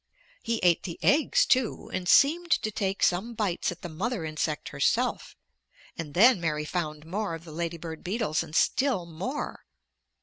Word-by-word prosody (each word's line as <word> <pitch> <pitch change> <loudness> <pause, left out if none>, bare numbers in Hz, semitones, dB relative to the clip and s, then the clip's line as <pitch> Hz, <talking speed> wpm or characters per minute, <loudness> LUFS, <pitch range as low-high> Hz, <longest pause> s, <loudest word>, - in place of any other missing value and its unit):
He 230 0 -1
ate 175 -2 +4
the 170 -3 -6
eggs, - - +4
too, 255 -3 0
and 185 0 -2
seemed 340 +5 +5
to 220 -8 +1
take 195 -2 -2
some 200 +7 +1
bites 195 -6 -1
at 175 - -11
the - - -3
mother 190 +3 -3
insect 155 -1 -3
herself, - - 0 0.6
and 150 -3 -7
then 220 +1 +6
Mary 150 -2 -1
found 155 -2 -4
more 190 +1 -3
of 165 - -11
the 165 - -11
lady 170 +1 -3
bird 160 -1 -8
beetles, 190 -4 -1
and 160 -1 -8
still 255 -7 +2
more. 185 - -5
180 Hz, 170 wpm, -27 LUFS, 165-230 Hz, 0.6 s, then